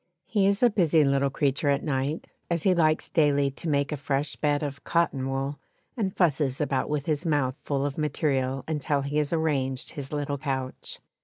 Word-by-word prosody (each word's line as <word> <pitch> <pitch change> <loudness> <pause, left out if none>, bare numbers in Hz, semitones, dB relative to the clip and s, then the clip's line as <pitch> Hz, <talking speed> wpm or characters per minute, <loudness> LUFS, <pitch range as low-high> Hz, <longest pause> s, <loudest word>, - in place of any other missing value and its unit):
He 200 -3 +2
is 200 +3 +2
a 240 - +6
busy 170 -6 +4
little 140 0 +2
creature 140 +1 0
at 140 0 +1
night, 140 +2 -1 0.2
as 170 -2 0
he 190 - +4
likes 155 -3 +2
daily 145 -3 +2
to 160 +4 -5
make 140 0 +1
a 150 - -2
fresh 140 +1 -2
bed 145 0 0
of 140 -1 -5
cotton 140 -6 0
wool, 135 +2 -2 0.4
and 200 -6 -2
fusses 145 -6 +2
about 135 -3 0
with 150 -1 -1
his 155 0 0
mouth 145 -6 +1
full 140 -1 -1
of 145 +1 -3
material 135 -3 0
until 150 -2 0
he 145 +2 -2
has 150 -1 +1
arranged 140 -6 -1
his 140 -2 -7
little 145 -1 -2
couch. 130 -1 -4
145 Hz, 190 wpm, -27 LUFS, 135-155 Hz, 0.4 s, a